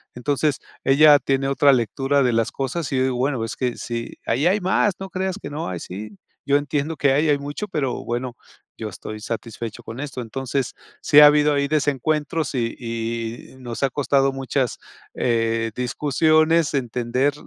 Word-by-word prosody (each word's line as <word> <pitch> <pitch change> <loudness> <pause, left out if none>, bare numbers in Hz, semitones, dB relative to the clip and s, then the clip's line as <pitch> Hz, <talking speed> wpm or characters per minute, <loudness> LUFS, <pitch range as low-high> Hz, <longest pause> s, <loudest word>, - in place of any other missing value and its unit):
Entonces, 145 +3 0 0.3
ella 145 +2 +6
tiene 135 0 0
otra 140 +1 +5
lectura 135 +3 +1
de 125 -2 +2
las 115 0 +1
cosas, 140 +4 -3
y 130 -1 +2
bueno, 125 -2 -1
es 115 - -6
que 125 -2 -2
si 115 -1 -5
ahí 130 +8 +1
hay 195 +4 +3
más, 185 +1 +1
no 195 0 -6
creas 190 0 -2
que - - -8
no 150 -5 -4
hay, 90 -2 -4
sí. 100 +3 -8 0.3
Yo 140 0 +4
entiendo 145 +2 -2
que 140 -2 +3
hay, 150 +3 +2
hay 145 - +4
mucho, 145 +9 -5
pero 140 -7 -2
bueno, 120 +1 -3 0.4
yo 110 -1 -5
estoy 110 0 -8
satisfecho 115 -1 -5
con 115 +4 -8
esto. 140 -3 -6
Entonces 130 +2 -3 0.3
sí 150 0 +7
ha 150 - +11
habido 150 0 +4
ahí 140 0 0
desencuentros, 150 +1 0
y 115 -2 -1
y 115 +1 -5
nos 120 -1 -6
ha 135 - +3
costado 135 0 +1
muchas, 135 -2 -1 0.4
eh, 115 -1 0
discusiones 155 +5 +2
entender, 125 +2 0
135 Hz, 170 wpm, -22 LUFS, 120-145 Hz, 0.4 s, ha